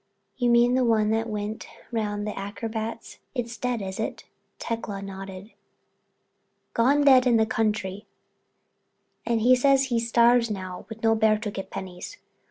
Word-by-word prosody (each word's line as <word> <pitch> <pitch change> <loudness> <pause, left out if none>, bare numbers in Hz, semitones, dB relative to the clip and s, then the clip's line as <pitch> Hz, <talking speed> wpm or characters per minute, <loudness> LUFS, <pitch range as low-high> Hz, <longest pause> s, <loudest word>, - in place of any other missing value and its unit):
"You 245 -2 +1
mean 240 +1 +5
the 255 0 +3
one 220 -2 +2
that 225 +1 0
went 210 0 -4 0.2
round 210 -2 -2
with 210 - -3
the - - -7
acrobats. 220 +3 -5 0.2
It's 235 -2 -3
dead, 245 -4 -2
is 190 0 -6
it?" - - -4 0.3
Tecla 225 -3 -4
nodded. 195 +1 -8 1.2
"Gone 275 +5 +3
dead 260 -2 +6
in 235 -2 +4
the 220 - +3
country. 215 -2 -2 1.2
And 230 -1 +1
he 250 +3 +6
says 275 +1 +3
he 230 - +3
starve 235 +1 +3
now 185 -3 -6
with 220 0 -9
no 225 0 +4
bear 220 -1 +3
to 210 -1 -4
get 195 -1 -6
pennies. 190 - -7
225 Hz, 160 wpm, -25 LUFS, 205-235 Hz, 1.2 s, dead